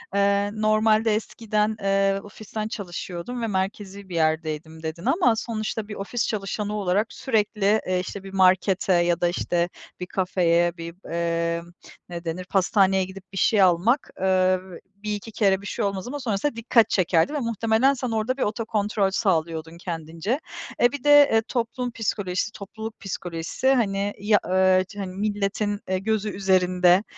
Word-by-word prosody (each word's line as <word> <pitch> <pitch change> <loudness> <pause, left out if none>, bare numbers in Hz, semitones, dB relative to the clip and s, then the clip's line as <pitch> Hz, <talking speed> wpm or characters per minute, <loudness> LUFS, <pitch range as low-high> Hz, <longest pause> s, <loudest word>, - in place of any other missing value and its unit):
Eee, 200 0 +2
normalde 215 0 +3
eskiden, 215 -1 -1
eee, 195 0 +2
"ofisten 215 +1 -6
çalışıyordum 195 +3 -5
ve 230 - -1
merkezî 195 0 -3
bir 175 - -6
yerdeydim" 160 0 -1
dedin 160 +2 -5
ama 255 -10 +3
sonuçta 220 -1 -3
bir 210 - -7
ofis 210 +4 -2
çalışanı 210 0 -3
olarak 205 +2 0
sürekli, 215 -3 +1
eee, 185 0 +1
işte, 195 +1 -6
bir 195 0 -10
markete 190 0 +3
ya 175 0 +2
da, 175 - +3
işte, 175 0 0 0.3
bir 180 - -4
kafeye 175 -2 +1
bir, 170 +1 -7 0.2
eee, 170 0 0 0.5
ne 170 0 -6
denir 175 +2 -4
pastaneye 190 0 +3
gidip 190 0 -10
bir - - -6
şey 210 0 +3
almak, 190 - +3
eee, 185 -1 +3 0.4
1-2 210 +1 -4
kere 195 -2 +2
bir 205 - -8
şey 225 - -2
olmaz 195 +1 -3
ama 290 +3 -4
sonrasında 230 +2 -1
dikkat 230 0 +3
çekerdi 180 - +2
ve 295 - -1
muhtemelen 230 +2 +2
sen 250 -3 -3
orada 225 +4 -1
bir - - -5
otokontrol 210 -2 0
sağlıyordun 165 -4 -1
kendince. 170 - -3 0.4
Eee, 240 - +5
bir 285 -3 -6
de, 290 -1 +7
eee, 225 - +5
toplum 245 0 -2
psikolojisi, 205 -3 -2
topluluk 220 +2 -8
psikolojisi, 180 +4 -3
hani, 205 -4 0
ya 205 +1 +3
eee, 185 0 +4
hani, 190 -2 -4
milletin, 205 0 -1
eee, 185 0 +1
gözü 215 +1 -1
üzerinde 185 -1 +3
200 Hz, 155 wpm, -24 LUFS, 180-220 Hz, 0.5 s, de